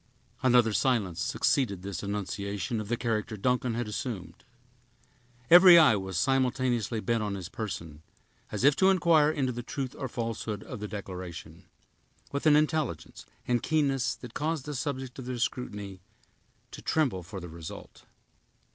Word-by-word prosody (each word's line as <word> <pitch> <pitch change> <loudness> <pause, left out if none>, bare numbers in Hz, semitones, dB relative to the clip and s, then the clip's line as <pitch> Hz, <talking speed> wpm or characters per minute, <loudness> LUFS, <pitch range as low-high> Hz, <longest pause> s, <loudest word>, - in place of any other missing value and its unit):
Another 120 -4 +4
silence 100 -10 +1
succeeded 100 0 0
this 100 -3 -5
annunciation 100 +2 -3
of 105 - -7
the 120 +2 -1
character 110 -2 -2
Duncan 125 +2 0
had 120 -1 -2
assumed. 105 -6 -5 1.0
Every 175 +2 +9
eye 155 -10 +7
was 95 -3 -4
simultaneously 125 -1 +1
bent 115 +3 0
on 105 -2 -2
his 95 -2 -6
person, 85 -9 -6 0.5
as - - -3
if 140 +1 +6
to 190 - +5
inquire 170 -5 +4
into 135 -4 0
the 120 0 -5
truth 130 +1 -5
or 135 - -4
falsehood 115 -3 -4
of - - -8
the 105 - -4
declaration, 90 -4 -8 0.7
with 140 +2 -1
an 150 - +7
intelligence 150 - -1 0.2
and 120 -1 +1
keenness 140 -3 +1
that 120 -2 -11
caused 155 -1 -2
the 150 - -4
subject 130 -1 -4
of 130 - -7
their 125 -1 -3
scrutiny 105 -6 -4 0.7
to - - -9
tremble 130 -13 0
for 95 +3 -8
the 90 - -8
result. 80 -1 -10
115 Hz, 155 wpm, -29 LUFS, 100-135 Hz, 1.0 s, Every